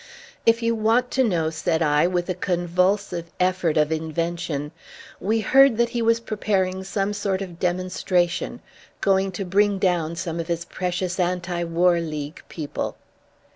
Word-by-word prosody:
"If 230 +1 +4
you 230 0 +2
want 230 +3 +2
to 260 - +3
know," 170 -8 +1
said 160 0 0
I, 150 +1 +3
with 175 -1 -1
a 185 - 0
convulsive 180 0 0
effort 180 -3 +1
of 150 0 +3
invention, 160 -2 -2 0.5
"we 220 +3 0
heard 270 +2 +5
that 235 0 +2
he 235 - -2
was 230 0 +3
preparing 195 -4 -1
some 195 +1 -1
sort 200 -2 -1
of 180 -3 -7
demonstration, 180 -1 0 0.4
going 195 0 +2
to 195 +1 -4
bring 200 +2 +2
down 175 -4 0
some 170 -1 -4
of 165 - -3
his 170 -1 -2
precious 180 +1 -3
anti 175 -1 -1
war 170 +1 +3
league 155 -1 -5
people." 150 -4 -4
180 Hz, 155 wpm, -23 LUFS, 170-200 Hz, 0.5 s, heard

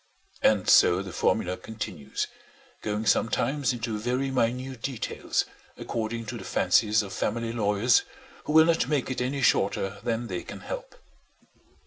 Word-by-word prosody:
And 105 -4 +3
so 90 +2 +6
the 95 - -7
formula 90 -1 +1
continues, 110 -10 -5 0.6
going 105 +1 -2
sometimes 125 +5 +1
into 115 -3 -3
very 125 +4 -1
minute 125 0 -1
details, 130 -3 -2 0.3
according 115 0 -3
to - - -5
the - - -8
fancies 110 0 +3
of 100 - -8
family 115 +1 -2
lawyers, 105 +1 +3 0.4
who 150 - -2
will 160 0 +8
not 165 0 +2
make 140 -4 0
it 130 - -2
any 135 +2 -1
shorter 100 -2 +1
than 120 0 -1
they 90 -6 -4
can - - -9
help. - - -7
115 Hz, 145 wpm, -27 LUFS, 105-125 Hz, 0.6 s, will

